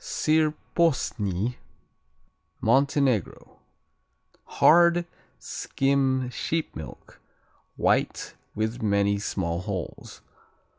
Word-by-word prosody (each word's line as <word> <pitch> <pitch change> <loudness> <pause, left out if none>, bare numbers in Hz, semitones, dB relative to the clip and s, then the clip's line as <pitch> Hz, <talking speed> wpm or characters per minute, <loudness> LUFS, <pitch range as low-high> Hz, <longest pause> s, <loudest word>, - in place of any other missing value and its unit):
Sir 155 0 +1 0.2
Posny 120 - 0 1.0
Montenegro 135 - +1 0.9
Hard; 170 +1 +4 0.3
skim 135 -2 0
sheep 160 +5 -3
milk; - - -10 0.5
white, - - 0 0.2
with 110 +3 -2
many 100 -1 +1
small 85 -5 -2
holes. 95 -3 -6
125 Hz, 65 wpm, -26 LUFS, 100-150 Hz, 1.0 s, Hard